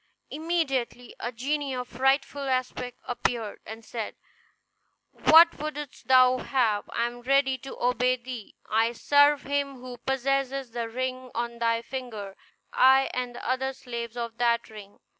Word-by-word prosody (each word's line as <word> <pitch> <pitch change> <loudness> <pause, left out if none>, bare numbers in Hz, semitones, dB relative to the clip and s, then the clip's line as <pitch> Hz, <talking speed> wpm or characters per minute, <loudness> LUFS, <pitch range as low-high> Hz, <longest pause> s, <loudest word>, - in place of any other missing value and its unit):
Immediately 280 -7 -2
a 240 - -3
genie 275 +3 -2
of 250 -1 -4
frightful 270 +2 +1
aspect 255 -1 -2
appeared, 235 -3 -2
and 220 +1 -9
said, 225 -2 -5 1.1
"What 330 +2 +8
wouldst 295 -2 -6
thou 255 -1 +6
have? 230 -7 0
I 235 - 0
am 240 0 -5
ready 270 +1 +3
to 270 - -9
obey 250 +1 +2
thee. 245 -3 -9
I 225 +2 +2
serve 285 +3 +4
him 280 0 -1
who 250 -1 -9
possesses 270 0 -1
the 230 -1 -3
ring 255 +1 -3
on 235 0 -3
thy 230 0 +1
finger; 225 -7 -6 0.4
I 265 +1 +5
and 250 -1 -3
the - - -7
other 265 +1 0
slaves 235 -3 -6
of 235 -1 -5
that 235 -1 +1
ring." 205 -2 -12
255 Hz, 145 wpm, -27 LUFS, 235-270 Hz, 1.1 s, What